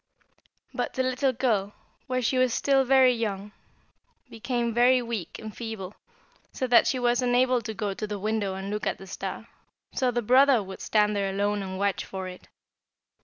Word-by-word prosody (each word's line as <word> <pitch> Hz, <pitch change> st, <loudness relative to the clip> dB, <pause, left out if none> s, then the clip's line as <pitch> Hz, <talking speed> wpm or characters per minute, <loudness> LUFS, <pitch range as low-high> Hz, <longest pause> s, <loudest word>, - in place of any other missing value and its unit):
"But -, -, -3 dB
the 260 Hz, -, +1 dB
little 255 Hz, +1 st, +1 dB
girl, 220 Hz, -5 st, 0 dB, 0.3 s
while 255 Hz, -1 st, -1 dB
she 255 Hz, +2 st, +1 dB
was 255 Hz, -2 st, +2 dB
still 275 Hz, -1 st, +3 dB
very 260 Hz, -1 st, +5 dB
young, 210 Hz, -3 st, -3 dB, 0.8 s
became 235 Hz, 0 st, -2 dB
very 250 Hz, +2 st, +5 dB
weak 230 Hz, -8 st, -5 dB
and 215 Hz, -1 st, -9 dB
feeble, 220 Hz, -5 st, -6 dB, 0.6 s
so 260 Hz, -, -3 dB
that 240 Hz, -2 st, +5 dB
she 260 Hz, -, +1 dB
was 245 Hz, 0 st, +1 dB
unable 250 Hz, 0 st, +2 dB
to 220 Hz, -1 st, -6 dB
go 205 Hz, -2 st, -2 dB
to 215 Hz, +2 st, -5 dB
the 210 Hz, 0 st, -4 dB
window 205 Hz, -1 st, -2 dB
and 195 Hz, +1 st, -5 dB
look 210 Hz, -2 st, -3 dB
at -, -, -1 dB
the 195 Hz, -, -11 dB
star, 190 Hz, -, -6 dB, 0.5 s
so 255 Hz, -, +1 dB
the 240 Hz, 0 st, -1 dB
brother 255 Hz, 0 st, +5 dB
would 190 Hz, 0 st, -9 dB
stand 210 Hz, -1 st, +2 dB
there 200 Hz, -1 st, 0 dB
alone 205 Hz, +1 st, -1 dB
and 190 Hz, -1 st, -5 dB
watch 200 Hz, 0 st, 0 dB
for 190 Hz, -1 st, -6 dB
it. 180 Hz, 0 st, -11 dB
225 Hz, 185 wpm, -26 LUFS, 200-250 Hz, 0.8 s, very